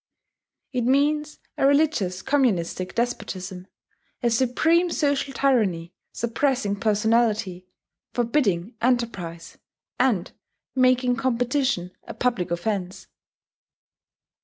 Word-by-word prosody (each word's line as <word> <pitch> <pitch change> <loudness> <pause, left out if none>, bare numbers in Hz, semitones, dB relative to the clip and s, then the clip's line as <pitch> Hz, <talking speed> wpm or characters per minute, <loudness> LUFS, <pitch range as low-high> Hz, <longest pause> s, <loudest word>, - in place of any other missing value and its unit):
It 250 -2 0
means 295 +3 +1 0.2
a 270 - +4
religious 280 - +1
communistic 195 -10 0
despotism, 190 -6 -3 0.6
a 235 - +2
supreme 310 +9 +2
social 285 -4 0
tyranny 215 -11 +1 0.2
suppressing 235 -3 -1
personality, 210 -3 +1 0.4
forbidding 230 - 0
enterprise, 210 -9 -2 0.4
and 230 -8 +1 0.4
making 255 -1 +3
competition 250 -6 0 0.2
a - - -7
public 235 -8 0
offence. 180 +1 -3
235 Hz, 85 wpm, -24 LUFS, 185-265 Hz, 0.6 s, a